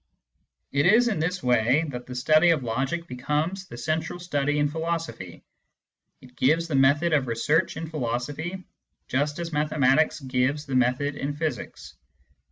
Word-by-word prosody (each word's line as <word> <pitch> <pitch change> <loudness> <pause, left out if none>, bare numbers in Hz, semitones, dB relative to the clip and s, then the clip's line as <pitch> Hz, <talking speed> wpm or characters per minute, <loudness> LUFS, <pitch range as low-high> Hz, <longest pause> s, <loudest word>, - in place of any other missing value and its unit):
It 145 +4 +2
is 235 +5 +5
in 210 - -1
this 180 +4 -2
way 125 +5 +3
that 125 -2 -7
the 125 - -7
study 155 +6 +4
of 160 -5 +2
logic 135 +8 -2
becomes 155 +8 -2
the 120 - -10
central 160 +6 -2
study 145 -4 -1
in 145 0 +2
philosophy: 160 - -4 0.8
it 125 -1 -17
gives 160 +5 +2
the 160 - -5
method 140 +5 +3
of 140 -4 +2
research 150 +10 +1
in 160 0 -5
philosophy, 150 +6 -4 0.4
just 145 +3 -1
as 170 -1 -5
mathematics 150 0 +2
gives 135 +2 -1
the 135 - -6
method 130 +3 +1
in 145 0 -4
physics. 150 -4 -5
145 Hz, 155 wpm, -25 LUFS, 130-165 Hz, 0.8 s, is